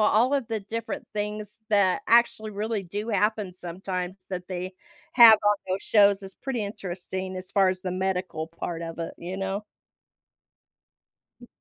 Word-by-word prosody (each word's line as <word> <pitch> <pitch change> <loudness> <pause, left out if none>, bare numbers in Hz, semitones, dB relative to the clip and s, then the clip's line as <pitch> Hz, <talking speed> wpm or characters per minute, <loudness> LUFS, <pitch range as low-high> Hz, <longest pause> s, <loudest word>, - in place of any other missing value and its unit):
all 230 +5 +4
of 270 -5 0
the 220 -2 -2
different 225 +1 -5
things 210 0 -4
that 200 -3 +3
actually 230 -2 +4
really 210 0 -2
do 205 +5 -5
happen 210 -2 +1
sometimes 180 +1 -5 0.2
that 180 -1 -4
they 185 0 -4 0.4
have 230 -3 +9
on 205 0 +5
those 190 +2 -1
shows 200 -2 +4
is 190 0 -9
pretty 255 -6 -3
interesting, 190 -2 -5
as 185 0 -7
far 195 -2 +4
as 185 0 -2
the 185 - -2
medical 185 -3 -2
part 165 0 -5
of 165 0 -6
it, 165 - -4
you 180 +2 -5
know? 195 +2 -3 1.8
M 240 - -12
195 Hz, 160 wpm, -26 LUFS, 185-215 Hz, 1.8 s, have